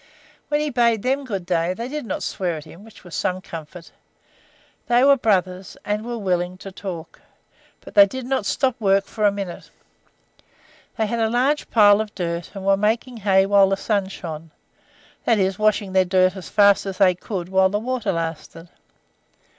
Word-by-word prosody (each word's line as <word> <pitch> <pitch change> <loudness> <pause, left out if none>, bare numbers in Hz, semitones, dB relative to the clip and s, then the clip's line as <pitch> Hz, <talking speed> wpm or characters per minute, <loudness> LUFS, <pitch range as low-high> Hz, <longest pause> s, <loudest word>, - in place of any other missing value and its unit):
When 295 0 0
he 300 -1 -1
bade 235 -3 +2
them 270 +2 0
good 195 -7 -4
day, 175 0 0
they 235 +3 -5
did 295 -2 -5
not - - -3
swear 175 -4 -2
at 150 - -9
him, 165 +5 -14
which 225 0 -16
was 175 - -13
some 185 0 -1
comfort. 170 -2 -10 1.0
They 240 +1 +4
were 280 0 +6
brothers, 190 -6 -1
and 210 +1 -2
were 240 0 -5
willing 180 -3 -1
to 195 +1 -9
talk, 180 -4 -8 0.6
but - - -13
they 200 0 +8
did 260 +4 -6
not 255 -6 -1
stop 260 -3 0
work 195 -1 +3
for 215 -2 -2
a 205 - +5
minute. 195 -3 -7 1.3
They 220 - +1
had 230 +2 -2
a 225 -1 +1
large 260 +6 0
pile 205 -2 +5
of 215 -1 -7
dirt, 170 -2 -3
and 195 -1 -7
were 195 0 +4
making 225 +4 -1
hay 195 -2 +3
while 200 -1 +4
the 195 - 0
sun 200 -2 -1
shone 165 -4 -8 0.8
that 230 - +3
is, 190 -1 0
washing 215 -2 +1
their 190 0 +4
dirt 185 0 +2
as 190 - -9
fast 200 -1 +4
as 190 -1 -5
they 185 -2 +5
could 180 0 -6
while 190 0 +3
the 205 - -1
water 250 +2 -2
lasted. 165 0 -5
195 Hz, 190 wpm, -22 LUFS, 185-225 Hz, 1.3 s, they